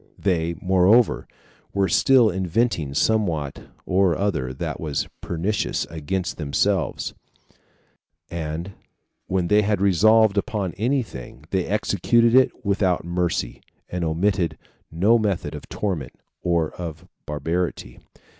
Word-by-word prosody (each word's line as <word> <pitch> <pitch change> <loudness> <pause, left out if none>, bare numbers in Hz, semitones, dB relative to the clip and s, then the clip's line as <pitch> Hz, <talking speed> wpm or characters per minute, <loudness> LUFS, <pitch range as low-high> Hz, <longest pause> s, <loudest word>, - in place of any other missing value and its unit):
They, 85 -3 0
moreover, 95 +5 +3 0.5
were 100 -1 +2
still 120 +5 +5
inventing 90 - 0
somewhat 85 -8 0 0.2
or 90 -3 +2
other 85 -10 -1
that 65 - -4
was 75 -3 -2
pernicious 90 +5 -1
against 90 +3 -3
themselves; 85 +5 0 1.2
and 85 +2 -4 0.6
when 90 -2 0
they 105 +2 +4
had 105 -1 0
resolved 100 +2 +4
upon 100 -3 -3
any 125 +5 0
thing, 70 - -11
they 95 -2 0
executed 110 +3 +2
it 130 -1 +3
without 95 -4 +1
mercy, 85 -7 -2 0.3
and 90 -1 -3
omitted 85 0 0 0.3
no 100 +9 +3
method 100 -5 -1
of - - -9
torment 90 -11 -3 0.3
or 85 -3 +1
of 85 0 -7 0.2
barbarity. 75 -3 -3
90 Hz, 115 wpm, -23 LUFS, 80-105 Hz, 1.2 s, still